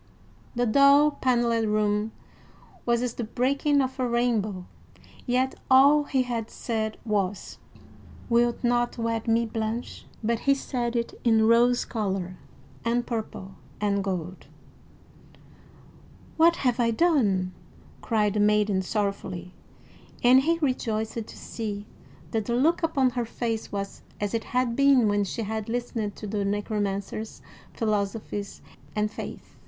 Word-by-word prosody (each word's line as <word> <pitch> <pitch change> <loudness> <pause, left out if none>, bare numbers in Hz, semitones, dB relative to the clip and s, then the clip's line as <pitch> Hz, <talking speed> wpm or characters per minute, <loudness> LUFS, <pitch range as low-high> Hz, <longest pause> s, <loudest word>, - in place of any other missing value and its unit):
The 245 +1 +1
dull 280 +5 +6
paneled 235 -4 +1
room 210 0 +1 0.8
was 235 0 +2
as 245 -2 -2
the 240 - -4
breaking 275 +5 +1
of 260 +1 -5
a 255 - +1
rainbow; 220 -6 0 0.6
yet 255 +2 +1 0.2
all 280 +3 +6
he 265 -2 +1
had 235 -3 -3
said 220 -2 -3
was, 205 -3 -2 0.7
"Wilt 235 +1 +2
not 240 0 +1
wed 230 -1 -2
me, 230 +1 +3
Blanche?" 220 +1 -4 0.2
But 230 +1 +1
he 275 +2 +3
said 245 -3 -3
it 235 0 -1
in 225 -2 +4
rose 240 +2 +4
color 190 -5 -3 0.5
and 240 +1 0
purple 215 -4 -5 0.3
and 200 -1 0
gold. 185 -2 -4 1.9
"What 335 +1 +5
have 250 -2 0
I 235 -1 +3
done?" 220 - +2 0.5
cried 210 -3 +1
the 210 - 0
maiden 210 -2 +3
sorrowfully; 190 -3 -3 0.7
and 250 +2 +7
he 330 +4 +1
rejoiced 225 -5 -1
to - - -11
see 210 -3 -5 0.5
that 220 -2 -1
the 235 - -1
look 320 +8 +2
upon 275 -6 +2
her 240 -1 -2
face 230 -1 -3
was 200 -1 -5 0.2
as 205 0 -2
it 225 -1 -1
had 250 -2 0
been 275 -4 +5
when 205 0 +2
she 225 +4 -4
had 220 +1 -4
listened 230 -3 -3
to - - -8
the 205 0 -2
Necromancer's 205 +1 -3 0.3
philosophies 205 -2 -2 0.3
and 210 0 0
faiths. - - -8
230 Hz, 135 wpm, -26 LUFS, 210-245 Hz, 1.9 s, and